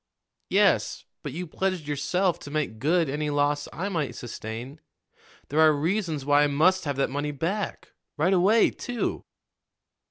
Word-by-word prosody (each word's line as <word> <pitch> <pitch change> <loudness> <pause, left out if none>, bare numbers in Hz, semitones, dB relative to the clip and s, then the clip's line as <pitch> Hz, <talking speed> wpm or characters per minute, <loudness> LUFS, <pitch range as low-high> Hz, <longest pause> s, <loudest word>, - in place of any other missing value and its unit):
"Yes, - - +2 0.2
but - - -5
you 175 +6 -4
pledged 185 -1 -2
yourself 170 +5 0
to - - -9
make 145 -7 -2
good 165 +4 +2
any 150 +2 -2
loss 145 0 +1
I 185 +5 -3
might 165 -8 -2
sustain. 120 +5 -7 0.7
There 150 - 0
are 160 -1 +7
reasons 160 -1 -1
why 145 0 +5
I 150 - +4
must 165 +6 +3
have 145 -2 -1
that 135 0 0
money 145 +2 -2
back 170 +7 -3 0.3
right 170 +6 +3
away, 200 +5 +4
too." 245 -1 -3
155 Hz, 155 wpm, -26 LUFS, 145-180 Hz, 0.7 s, are